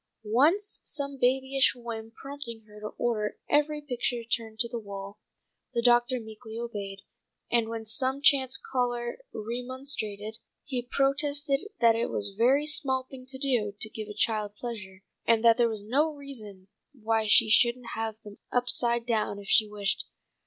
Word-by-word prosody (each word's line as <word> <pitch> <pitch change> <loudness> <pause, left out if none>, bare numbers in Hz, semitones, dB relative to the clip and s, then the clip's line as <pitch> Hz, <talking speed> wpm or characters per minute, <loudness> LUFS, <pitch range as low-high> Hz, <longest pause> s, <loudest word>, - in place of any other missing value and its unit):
Once, 300 - +2
some 280 -1 -2
babyish 265 +1 +3
whim 230 -2 -6
prompting 255 -1 -7
her 210 0 -14
to 215 - -5
order 215 -3 -1
every 300 +1 +2
picture 245 -3 -2
turned 225 -1 -2
to 235 +1 +3
the 235 0 -4
wall, 200 -1 -8 0.6
the 235 - +2
doctor 240 +1 +4
meekly 220 0 -9
obeyed, 200 -4 -5 0.5
and 235 -2 +2
when 225 -1 -5
some 260 +5 +1
chance 265 -2 +4
caller 245 - -2
remonstrated, 230 -2 -4 0.2
he 255 -3 -2
protested 275 +2 +1 0.2
that 230 -1 +6
it 230 +1 -1
was 200 0 -1
a - - -20
very 260 +7 +3
small 265 -3 +2
thing 255 -1 -10
to 265 0 -4
do 245 -7 +1
to 220 - +2
give 215 -1 -6
a 210 - -8
child 210 -1 0
pleasure, 205 -5 -7 0.2
and 230 0 +4
that 230 0 +7
there 240 -1 +4
was 215 -2 -4
no 290 +8 +2
reason 225 -10 -8 0.3
why 220 0 +1
she 220 +2 +7
shouldn't 235 +2 +4
have 225 -1 -3
them 205 -2 -12
upside 240 -1 +1
down 220 -4 0
if 200 -1 -10
she 215 - +5
wished. 205 -1 0
235 Hz, 165 wpm, -28 LUFS, 215-265 Hz, 0.6 s, that